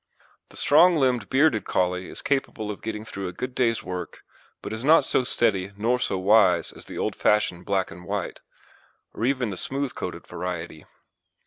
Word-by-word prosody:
The - - -13
strong 170 +5 +5
limbed 125 -7 +1
bearded 135 -6 +3
Collie 90 0 -1
is - - -9
capable 120 -6 -1
of 100 - -9
getting 110 -1 -5
through 100 -3 -5
a - - -4
good 125 +5 -5
day's 115 -3 +1
work, 90 -2 -6 0.4
but 105 - -5
is 110 +2 -5
not 155 +4 +5
so - - +2
steady 100 -6 +1
nor 120 +4 +1
so 95 - -1
wise 95 -3 +4
as - - -12
the - - -9
old - - -2
fashioned 90 -4 +1
black 95 -2 0
and 90 +2 -11
white, 100 -1 -4 0.7
or 115 - -2
even 130 -4 0
the 95 - -6
smooth 135 +4 -2
coated - - -6
variety. 90 -2 -6
105 Hz, 185 wpm, -25 LUFS, 95-125 Hz, 0.7 s, strong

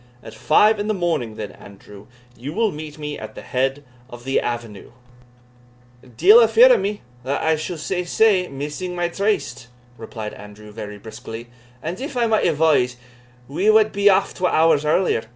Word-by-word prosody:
"At - - -11
five 210 +7 +3
in 205 - -2
the 215 - 0
morning, 165 - -2
then, 105 -2 -6
Andrew, 100 0 -15 0.3
you 130 +6 -7
will 220 +1 +1
meet 150 0 -9
me 150 -1 -6
at - - -9
the - - -9
head 135 +2 -2 0.3
of 120 -1 -11
the 135 +1 0
avenue." 115 -4 -6 1.2
"Deil 205 - +7
a 230 - +6
fear 235 +3 +7
o' - - +4
me 205 +2 -3 0.2
(that 135 +2 -2
I 160 0 +2
suld 155 +2 -5
say 180 +2 -2
sae) 185 0 +2
missing 150 +6 -6
my 175 -1 -1
tryste," 200 - -2 0.3
replied 110 -1 -7
Andrew, 105 +1 -12
very 105 -1 -8
briskly; 115 +2 -10 0.3
"and 170 +7 -5
if 275 -1 -5
I 240 - +2
might 220 -4 +2
advise, 150 -6 +2 0.5
we 185 +10 0
wad 215 0 +5
be 200 +1 +1
aff 190 - +2
twa 180 -1 0
hours 160 -2 +3
earlier. 155 -5 +1
155 Hz, 180 wpm, -21 LUFS, 120-200 Hz, 1.2 s, Deil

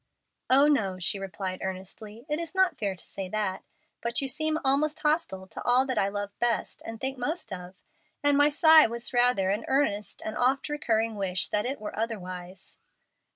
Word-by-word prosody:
"Oh, 275 +3 +6
no," 200 -11 +1
she 185 +2 +1
replied, 190 -1 -5
earnestly; 200 +5 -7
"it 300 0 -1
is 335 +2 -4
not 375 -1 +3
fair 200 -3 -1
to - - -12
say 190 -2 -7
that. 200 -2 -2 0.4
But 235 0 -1
you 275 - -1
seem 310 +3 0
almost 295 +3 +3
hostile 300 - 0
to - - -8
all 250 +2 +4
that 260 -1 -1
I 195 - +2
love 205 0 -3
best 240 -2 -1
and 225 0 -6
think 265 0 -2
most 300 - -2
of, 180 0 -8 0.5
and 290 0 +4
my 290 +1 +5
sigh 315 0 +7
was 235 +2 -4
rather 245 -6 +3
an 210 +3 -1
earnest 210 -8 -1
and 215 - -4
oft 265 +3 +1
recurring 225 -7 0
wish 185 -2 -1
that 210 +3 0
it 270 +2 -3
were 210 - -6
otherwise." 185 -4 -5
225 Hz, 190 wpm, -27 LUFS, 195-275 Hz, 0.5 s, sigh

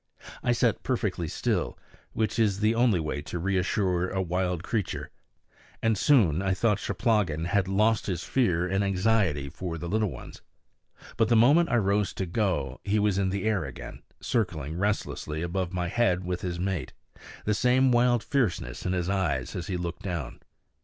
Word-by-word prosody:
I 120 - +1
sat 120 -1 +1
perfectly 105 -9 -1
still, - - -1 0.4
which 110 +1 -1
is 105 -3 +2
the 110 +1 +3
only 115 -5 +3
way 75 -2 -3
to 80 - -6
reassure 90 0 0
a 95 - -2
wild 90 -1 -1
creature; 105 -2 -3 0.7
and 115 -1 +3
soon 95 - +4
I 95 -1 0
thought 105 -1 +1
Cheplahgan 100 - 0
had 95 +1 +1
lost 105 +3 +2
his 90 -4 -2
fear 90 -9 +1
in 95 +2 0
his 100 - +1
anxiety 95 -7 +1
for 85 +3 -5
the 85 +1 -5
little 105 +3 +1
ones. - - -10 0.8
But 115 - +2
the 120 - +4
moment 145 +10 +5
I - - +2
rose 100 -1 +1
to 95 - -3
go 85 - -1
he 100 +2 +1
was 105 -2 +2
in 95 -1 +1
the 100 0 -2
air 110 -5 +1
again, - - -8 0.2
circling 80 - -2
restlessly 90 -6 -2
above 90 0 -2
my 90 -2 -2
head 95 -2 +1
with 90 0 -3
his 90 -3 -3
mate, 90 -7 -2 0.5
the 105 - +2
same 125 +4 +3
wild 120 -1 +3
fierceness 90 - -1
in 90 - 0
his 90 -2 -1
eyes 95 -4 -1
as 85 - -4
he 90 - -2
looked 85 -1 -5
down. 85 -9 -4
95 Hz, 180 wpm, -27 LUFS, 90-110 Hz, 0.8 s, moment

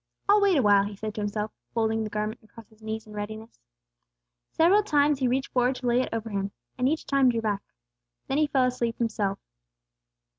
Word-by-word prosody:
"I'll 410 +1 +5
wait 395 -4 +4
awhile," 205 -5 +5
he 205 0 -6
said 215 +1 -5
to 210 - -4
himself, 210 +1 -2 0.2
folding 225 -1 +1
the 215 - -4
garment 215 +3 -3
across 220 0 -15
his 220 0 -24
knees 220 0 -5
in 215 - -13
readiness. 215 +2 -7 0.9
Several 365 +6 +4
times 295 -7 +2
he 260 - +2
reached 265 +2 -1
forward 250 +1 +2
to 255 - -7
lay 245 +1 +3
it - - -3
over 225 -1 -4
Him, 195 0 -2 0.3
and 255 +1 +1
each 315 +2 -2
time 275 -2 +3
drew 230 -2 0
back. 205 -2 -1 0.6
Then 270 +2 0
he 305 - +3
fell 270 -2 +2
asleep 240 -2 -1
himself. 215 -4 -1
230 Hz, 200 wpm, -27 LUFS, 215-265 Hz, 0.9 s, I'll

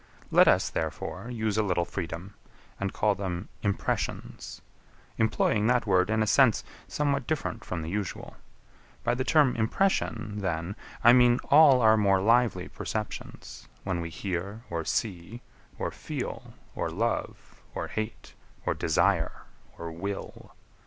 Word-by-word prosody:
Let - - +6
us, - - +4
therefore, 80 +8 -4
use 110 -3 -1
a - - +5
little 90 -4 0
freedom, 90 +1 -6 0.5
and 100 -1 -1
call 105 -1 +2
them 95 -3 -4
Impressions; 100 -2 -3 0.6
employing 110 -1 +2
that 125 -1 +2
word 95 -1 +3
in 110 0 +2
a - - 0
sense 115 +1 +4 0.2
somewhat 140 -3 -1
different 135 - -2
from 85 -3 -4
the 80 - -5
usual. 100 -2 -4 0.7
By 120 - +2
the 130 +1 -1
term 145 -3 +4
impression, 110 - 0
then, 90 0 -2 0.3
I 120 - +8
mean 125 -1 +6
all 140 -3 +8
our 110 -1 +6
more 100 -2 +3
lively 110 -3 +2
perceptions, 110 -1 -6 0.2
when 90 -3 -2
we 85 - -4
hear, 100 +5 -4
or 85 -1 -2
see, 105 +2 -3 0.3
or - - -2
feel, - - -6 0.2
or - - -2
love, - - -3
or - - -3
hate, 110 +1 -5 0.3
or - - +1
desire, - - +1 0.3
or 85 -1 -6
will. 95 +4 -6
105 Hz, 140 wpm, -28 LUFS, 90-120 Hz, 0.7 s, I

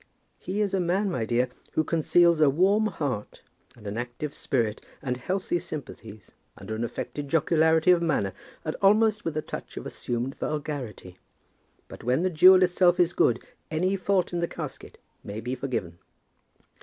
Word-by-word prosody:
"He 200 +3 -3
is 200 -2 0
a 190 - +2
man, 185 +3 +1
my 115 -9 -1
dear, 120 +2 +1 0.2
who 155 - +2
conceals 170 +1 +3
a 150 - +6
warm 195 +9 +3
heart, 135 - -4 0.3
and 110 - -16
an 105 +3 -3
active 125 +5 -5
spirit, 115 -5 -1 0.2
and 125 -3 -2
healthy 180 +5 -1
sympathies, 120 - -9 0.3
under 100 +2 -7
an 110 +2 -2
affected 145 +4 -5
jocularity 160 +2 +3
of 175 -1 +4
manner, 140 - 0 0.3
and 155 - -2
almost 210 +1 +4
with 160 -2 -3
a 155 - -1
touch - - -8
of - - -6
assumed 120 +2 -3
vulgarity. 140 - -5 0.7
But - - -11
when 125 +7 +1
the 185 - +1
jewel 185 +3 +7
itself 180 0 +3
is 175 -1 +3
good, 120 - +2 0.3
any 180 +5 0
fault 190 -1 0
in 175 - 0
the 170 - 0
casket - - -8 0.3
may 105 +1 -6
be 125 +3 -4
forgiven." 120 -10 -4
155 Hz, 170 wpm, -26 LUFS, 120-180 Hz, 0.7 s, jewel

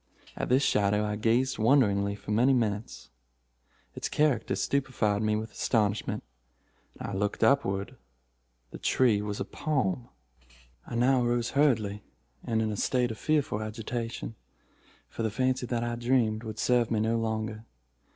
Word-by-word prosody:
At - - -3
this 130 +3 +4
shadow 105 -1 +2
I 105 0 -2
gazed 115 +4 +1
wonderingly 105 -5 +3
for 105 - -8
many 120 +6 +4
minutes. 105 - -2 0.8
Its - - -4
character 150 -3 +1
stupefied 120 -7 0
me 110 -1 +1
with 110 +1 -4
astonishment. 105 -3 0 0.8
I 100 - -5
looked 100 +3 -1
upward. 100 -6 +1 0.7
The - - -8
tree 115 -6 +3
was 105 -1 -4
a - - -2
palm. 125 -6 -2 0.8
"I - - -6
now 125 +1 +3
arose 120 0 0
hurriedly, 110 -8 +2 0.4
and 110 -1 0
in 110 - -1
a 105 - -4
state 125 +1 +1
of 110 - -8
fearful 145 -8 0
agitation—for 115 +1 -7
the 110 - +1
fancy 130 +3 0
that 120 -1 -1
I 120 0 -2
dreamed 120 -3 +1
would 110 -1 -6
serve 120 -1 +2
me 110 - +1
no 115 +2 +1
longer. 110 0 -3
115 Hz, 145 wpm, -28 LUFS, 105-125 Hz, 0.8 s, this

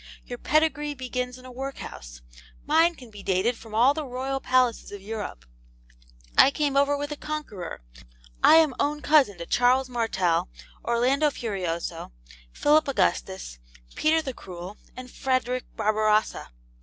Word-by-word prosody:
Your 245 -1 -7
pedigree 295 -1 +1
begins 250 -1 -4
in 255 - -15
a 255 - -10
workhouse; 245 - -8 0.4
mine 325 +3 +4
can 245 -6 -14
be 205 -1 -10
dated 195 +5 +1
from 220 -1 -10
all 250 +5 +5
the 310 +1 -4
royal 265 +1 -3
palaces 255 -3 +1
of 205 - -7
Europe. 205 - -6 0.9
I - - +8
came 285 -1 -1
over 280 +1 +3
with 290 +1 -4
the - - -3
Conqueror; 255 - -6 0.6
I - - +8
am 320 -4 +5
own 295 +1 -1
cousin 280 - +4
to 170 - -6
Charles 255 +4 +2
Martel, 190 - 0 0.3
Orlando 260 +6 +2
Furioso, 175 - -4 0.4
Philip 300 - +3
Augustus, 190 - -1 0.3
Peter 320 +1 +2
the 265 - -4
Cruel, 185 -1 -9 0.2
and 255 -1 -9
Frederick 255 -1 -1
Barbarossa. 215 0 +1
250 Hz, 145 wpm, -26 LUFS, 210-285 Hz, 0.9 s, I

